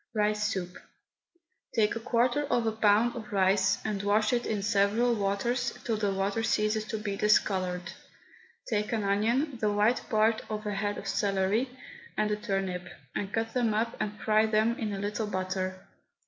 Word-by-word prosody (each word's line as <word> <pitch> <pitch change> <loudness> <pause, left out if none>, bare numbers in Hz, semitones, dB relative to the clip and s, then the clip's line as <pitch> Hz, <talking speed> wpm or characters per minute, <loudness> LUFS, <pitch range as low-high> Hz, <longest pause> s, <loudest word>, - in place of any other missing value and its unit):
RICE 210 0 +1
SOUP. 180 -3 -4 1.0
Take 215 -1 +2
a - - -2
quarter 240 +5 +1
of 240 -4 +1
a 225 - +2
pound 220 +2 +3
of 230 -1 -7
rice, 190 0 +3
and 210 -3 -1
wash 210 +3 +2
it 240 0 0
in 205 -2 -1
several 210 +3 +2
waters 225 +4 -1
till 230 - 0
the 210 -2 0
water 195 +3 -1
ceases 215 -1 +1
to 220 - -3
be 210 -2 -3
discoloured. 185 -4 +1 0.7
Take 210 -1 -1
an 220 -2 0
onion, 230 +7 +1
the 210 -1 +2
white 210 +4 +2
part 220 0 +3
of 215 0 -4
a 210 - -1
head 205 +1 -2
of - - -7
celery, 200 +5 +1 0.5
and 215 0 +1
a - - +2
turnip, 195 -4 -3 0.3
and 200 -1 -3
cut 225 0 -2
them 235 -4 +1
up 230 +2 0
and 210 0 -3
fry 215 0 +3
them 220 +2 +2
in 215 -2 -2
a 200 - -3
little 210 +2 -2
butter. 185 -1 -3
210 Hz, 175 wpm, -29 LUFS, 200-225 Hz, 1.0 s, pound